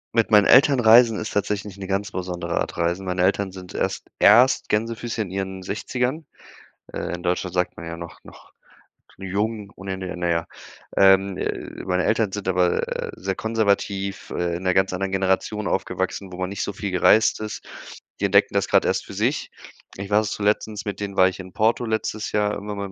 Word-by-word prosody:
Mit 115 -1 +3
meinen 105 -2 +6
Eltern 135 +3 +6
reisen 115 -1 +6
ist 110 - -5
tatsächlich 105 -1 -2
'ne 95 - -6
ganz 100 +1 -2
besondere 90 -2 -3
Art, - - -3
Reisen. 85 +3 -1
Meine 90 -1 -1
Eltern 100 0 +1
sind 90 -1 -10
erst, - - -3
erst 125 +2 +5
Gänsefüßchen 115 +1 -1
in 90 - -10
ihren 95 -1 -4
60ern. 125 - -3 0.7
Äh, - - -4
in 90 - -7
Deutschland 90 0 -1
sagt 90 0 -1
man 85 - -7
ja 85 0 -5
noch 85 0 -9
noch - - -16 0.7
jung, 100 +2 -3
ohne 95 0 -5
Ende 95 -1 -5
na 90 0 -1
ja. 85 0 0 0.5
Ähm, 95 0 +5
äh, - - -5
meine 90 0 0
Eltern 105 -4 +1
sind 100 -2 -3
aber 90 -1 +2 0.3
sehr 95 0 -3
konservativ, 100 -3 -1
äh, 85 -1 -1
in 90 - -9
'ner 95 -1 +2
ganz 95 0 +2
anderen 95 +1 -3
Generation 95 +2 0
aufgewachsen, 95 -2 -2
wo 90 - -7
man 90 0 -2
nicht 100 - -3
so 100 - -4
viel 100 0 -4
gereist 105 +4 +4
ist. 110 0 -6 0.6
Die 100 - +1
entdecken 100 +1 +3
das 100 -1 +1
grad - - +4
erst - - 0
für - - -10
sich. - - -1 0.4
Ich 100 +1 -7
war 105 - +3
erst 110 -1 -2
zu 105 - -5
letztens 105 +1 0
mit 105 -2 -5
denen 100 -1 -5
war 95 0 +5
ich 95 - -9
in 95 -1 -10
Porto 115 +2 +1
letztes 110 -1 -3
Jahr, 105 0 +1
irgendwann 105 0 -6
100 Hz, 200 wpm, -23 LUFS, 95-105 Hz, 0.7 s, meinen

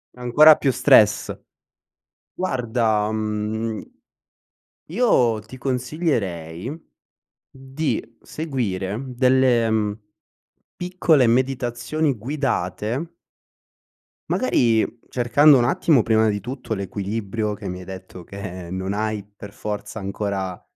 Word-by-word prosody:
Ancora 145 +6 +6
più 135 - +1
stress. 105 -3 +4 1.0
Guarda, 115 - 0
mhmm 110 +1 -3 1.0
io 130 - +2
ti 130 +5 -12
consiglierei, 125 - -2
mhmm, 160 +2 -8 0.7
di 130 -3 -4
seguire 110 - -3 0.2
delle, 130 -2 +3
uhm, 105 -1 0 0.8
piccole 175 -7 +2
meditazioni 125 +3 0
guidate 135 - -2 1.2
Magari 115 - +2 0.2
cercando 135 +4 +5
un 120 - +3
attimo 155 -3 +3
prima 110 0 +3
di 105 -1 -1
tutto 125 -2 -5
l'equilibrio 105 +2 -3
che 100 -2 -7
mi 90 0 -5
hai 90 - -10
detto 95 -2 -10
che 95 -3 -7
non 95 +1 -3
hai 105 0 -2
per 105 0 -13
forza 105 +1 -5
ancora 95 -2 -3
115 Hz, 100 wpm, -22 LUFS, 105-130 Hz, 1.2 s, Ancora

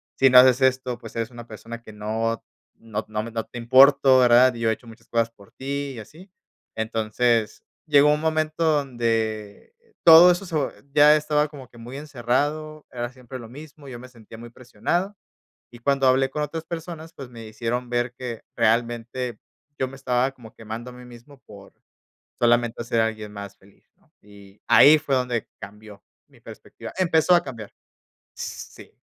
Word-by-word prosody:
"Si 135 - +4
no 125 - +8
haces 130 +1 +5
esto, 130 -1 +1
pues - - -12
eres 115 0 -2
una 120 -1 -11
persona 115 +2 -9
que 110 - -12
no 110 +2 -3 0.3
no 110 -1 -6
no 110 0 -3
no 115 -1 -5
te - - -11
importo, 130 +2 +6
¿verdad? 125 +1 +5
Y 115 - -8
yo 115 - +2
he 110 - +2
hecho 120 - -13
muchas 115 0 -15
cosas 115 -1 0
por 100 -3 -20
ti", 140 0 -5
y 115 - -8
así. 170 - -14 0.4
Entonces, 110 +1 -1 0.2
llegó 150 -1 +5
un 150 - -2
momento 155 0 -1
donde 115 - -1 0.3
todo 170 +2 +9
eso 180 +3 -2
se 165 - -5
vo 145 - 0 0.2
ya 150 0 +7
estaba 150 0 +1
como 135 -5 -12
que - - -18
muy 120 +3 -10
encerrado, 150 +3 -3
era 120 -1 -4
siempre 130 0 -10
lo 115 -2 -11
mismo, 145 +1 -13
yo 120 -2 -8
me 125 - -11
sentía 115 -2 -15
muy 120 0 -10
presionado. 130 - -3 0.6
Y 120 - -12
cuando 135 +1 +1
hablé 135 +1 +2
con 150 - -3
otras 160 +2 -5
personas, 165 -1 -8
pues 135 -3 -10
me 115 -2 -10
hicieron 120 +3 -4
ver 120 0 -1
que 120 -3 -6
realmente 120 +1 -1 0.4
yo 130 - 0
me 130 - -11
estaba 130 0 0
como 120 -4 -15
quemando 115 +2 -8
a - - -13
mí 125 0 -13
mismo 125 +4 -15
por 100 -1 -14 0.7
solamente 120 0 +2
ser 115 -1 +1
alguien 110 -2 -3
más 100 -1 -9
feliz, 100 +1 -24
¿no? - - -34
Y 100 -1 -18
ahí 145 +6 +7
fue 145 -3 -1
donde 125 -3 -2
cambió 105 0 -12 0.3
mi - - -22
perspectiva. - - -11
Empezó 175 -1 +3
a 175 - +2
cambiar. 115 -6 -9 0.6
Sí, - - -9
125 Hz, 180 wpm, -23 LUFS, 115-140 Hz, 0.7 s, todo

